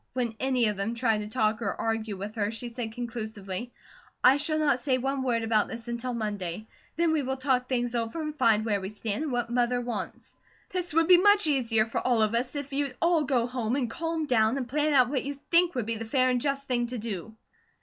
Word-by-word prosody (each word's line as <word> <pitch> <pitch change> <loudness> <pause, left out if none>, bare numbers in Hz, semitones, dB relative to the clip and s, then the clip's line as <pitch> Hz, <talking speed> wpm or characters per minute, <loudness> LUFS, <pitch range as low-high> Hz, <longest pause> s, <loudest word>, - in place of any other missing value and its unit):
When 245 -3 -1
any 255 -3 +2
of 210 -2 0
them 210 +4 -2
tried 230 -2 +1
to 210 - -5
talk 215 -1 0
or 200 - -1
argue 225 -2 -2
with 205 +3 -6
her 205 -2 -1
she 230 +2 -5
said 230 -1 -5
conclusively: 225 -2 -5 0.5
"I 260 +2 +7
shall 310 +2 +1
not 290 -5 +2
say 255 0 +1
one 270 +1 -1
word 240 -3 0
about 220 -2 +2
this 230 0 -7
until 240 +1 -3
Monday. 205 -3 -3 0.3
Then 335 0 +2
we 315 -2 +2
will 265 0 -2
talk 255 -1 0
things 245 -2 0
over, 230 +5 -2
and 305 -1 -3
find 225 -7 +3
where 205 -3 0
we 190 - -4
stand, 215 +1 -3
and 295 - -3
what 240 -1 -1
Mother 245 0 +1
wants. 245 0 -6 0.4
This 360 -1 -2
would 330 0 +4
be 360 -1 +8
much 410 +2 +5
easier 235 -7 +2
for 225 - -2
all 240 -3 +2
of 215 +1 +1
us, 245 +4 -1
if 285 -1 -5
you'd 275 -2 -2
all 335 -2 +3
go 255 -3 +1
home 245 -1 -2
and 250 -5 -1
calm 325 +1 -2
down, 230 -2 +2
and 255 -3 -3
plan 300 +4 +1
out 250 -2 +5
what 265 -2 -1
you 280 +1 -4 0.2
think 345 -1 +4
would 245 -4 -1
be 230 0 -2
the 225 - -5
fair 255 +3 +2
and 250 -1 0
just 275 0 -2
thing 240 -1 0
to 250 +1 -4
do." 215 -1 -5
245 Hz, 240 wpm, -28 LUFS, 225-275 Hz, 0.5 s, be